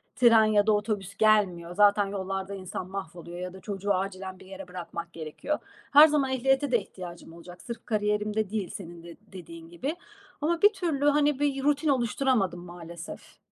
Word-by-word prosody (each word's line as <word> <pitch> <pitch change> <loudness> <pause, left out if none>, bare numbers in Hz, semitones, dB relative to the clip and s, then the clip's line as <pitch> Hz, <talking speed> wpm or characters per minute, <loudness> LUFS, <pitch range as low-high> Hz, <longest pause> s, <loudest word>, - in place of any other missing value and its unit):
tren 230 -3 +6
ya 210 -1 +3
da - - +5
otobüs 205 -2 -2
gelmiyor. 190 -6 +2
Zaten 205 0 +5
yollarda 195 0 -4
insan 185 -1 -6
mahvoluyor 175 -2 -7
ya 180 0 -5
da 190 - -11
çocuğu 200 0 -2
acilen 190 0 -4
bir 190 - -14
yere 190 0 -9
bırakmak 170 -1 -7
gerekiyor. 165 - -4 0.3
Her 295 +2 +10
zaman 290 -3 +1
ehliyete 270 +2 +1
de 240 - +4
ihtiyacım 175 -4 -10
olacak. 175 +1 -12
Sırf 235 -1 -8
kariyerimde 210 -1 0
değil, 205 -3 -3
senin 170 -3 -9
de 170 -1 -10 0.2
dediğin 165 -3 -10
gibi. 265 - -4 0.5
Ama 330 +3 0
bir 415 +1 +6
türlü, 330 -8 -1
hani, 290 -1 +3
bir 280 -2 0
rutin 295 +2 +2
oluşturamadım 240 -7 +1
maalesef. 170 -1 -10
200 Hz, 170 wpm, -27 LUFS, 180-255 Hz, 0.5 s, Her